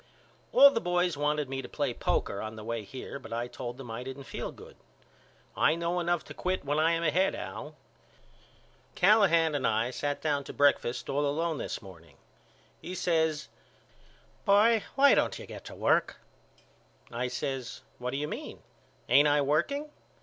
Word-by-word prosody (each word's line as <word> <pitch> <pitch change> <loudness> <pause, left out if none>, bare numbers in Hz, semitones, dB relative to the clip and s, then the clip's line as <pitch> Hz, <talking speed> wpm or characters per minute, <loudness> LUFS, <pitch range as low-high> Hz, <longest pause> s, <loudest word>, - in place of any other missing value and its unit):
All 280 0 +8
the 230 - -1
boys 175 -1 +1
wanted 150 0 0
me 135 0 -4
to - - -10
play - - -1
poker 100 - -1
on 110 0 -6
the 110 - -9
way 115 0 -3
here 130 +5 -8
but - - -12
I 120 +1 -2
told 120 0 -7
them 130 -4 -8
I 115 +2 -5
didn't 130 +2 -7
feel - - -5
good. - - -14 0.8
I 155 - +3
know 170 +1 -1
enough 175 -2 0
to - - -10
quit 185 -3 -2
when 145 +2 0
I 165 +2 +3
am 165 0 -1
ahead 180 +5 +2
Al. - - -7 1.2
Callahan 180 -5 +4
and 140 -4 0
I 115 +2 +1
sat 145 +2 -2
down 145 -2 0
to - - -8
breakfast 125 -4 +2
all 145 +2 0
alone 160 +2 -1
this - - -5
morning. 85 -7 -14 0.6
He 180 - -6
says 160 -4 0 1.0
Boy 215 +2 +5
why 280 +1 +6
don't - - +1
you - - -9
get - - -10
to - - -9
work? - - +1 0.9
I 120 +1 -2
says 125 0 -4 0.2
What 125 0 -3
do 135 - -3
you 150 +1 -2
mean? 240 - -7 0.4
Ain't 145 +2 +6
I 145 0 +3
working? 280 - 0
145 Hz, 175 wpm, -29 LUFS, 125-175 Hz, 1.2 s, All